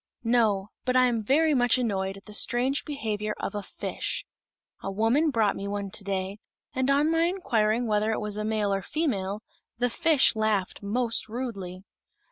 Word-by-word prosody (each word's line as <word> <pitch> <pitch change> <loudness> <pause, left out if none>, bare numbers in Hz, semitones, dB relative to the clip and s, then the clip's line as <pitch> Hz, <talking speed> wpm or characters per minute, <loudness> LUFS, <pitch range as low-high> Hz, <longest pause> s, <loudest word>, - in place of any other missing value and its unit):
"No; 220 -4 +2
but 255 0 0
I 255 - +6
am 240 -2 +1
very 300 +8 +3
much 245 -2 +4
annoyed 195 -5 -1
at 195 - -15
the 210 - -10
strange 250 +6 +1
behavior 215 -7 -3
of - - -3
a 205 - -3
fish. 195 - -4 0.6
A - - -4
woman 225 +10 +2
brought 225 -7 +2
me 200 - -5
one 200 -1 -3
to 205 - +3
day, 195 +1 -3 0.3
and 260 -1 0
on 290 +3 +3
my 330 0 +3
inquiring 240 - +1
whether 215 0 +1
it - - -1
was 210 -1 -3
a 210 - -2
male 215 -2 0
or 195 - -1
female, 210 - -2 0.3
the 245 0 0
fish 295 -2 +4
laughed 215 -4 0
most 230 +2 0
rudely." 200 -7 -5
220 Hz, 180 wpm, -27 LUFS, 200-255 Hz, 0.6 s, I